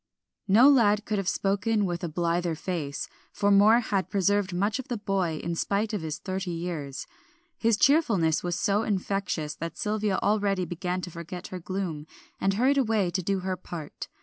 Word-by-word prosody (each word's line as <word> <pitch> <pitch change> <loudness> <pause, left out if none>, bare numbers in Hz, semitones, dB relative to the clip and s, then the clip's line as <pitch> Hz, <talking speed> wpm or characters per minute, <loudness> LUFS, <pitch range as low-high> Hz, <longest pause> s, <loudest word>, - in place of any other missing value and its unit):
No 220 +7 +7
lad 215 -7 +4
could 210 -2 -1
have 195 -1 0
spoken 205 +2 +1
with 175 -1 -3
a 170 - -2
blither 170 +1 0
face, 155 -4 -4 0.2
for 205 0 +1
Moor 210 +4 +6
had 200 -4 -1
preserved 200 0 +1
much 200 +7 0
of 265 - -6
the 240 - -2
boy 190 -6 -1
in 170 - -2
spite 205 +6 -1
of 205 - -1
his 160 -1 -4
thirty 190 -1 -4
years. 165 -5 -4 0.5
His 225 -2 +3
cheerfulness 215 - +3
was 175 -1 -2
so 205 0 +2
infectious, 195 -7 -2
that 165 +1 -5
Sylvia 210 -2 0
already 200 -3 +1
began 180 +2 -3
to 175 - -6
forget 170 +2 -7
her 185 - -6
gloom, 175 -4 -4 0.3
and 195 0 +1
hurried 265 +6 +3
away 215 -7 +1
to 185 - -1
do 195 +2 -1
her 185 0 -2
part. 170 -4 -8
190 Hz, 180 wpm, -27 LUFS, 175-210 Hz, 0.5 s, No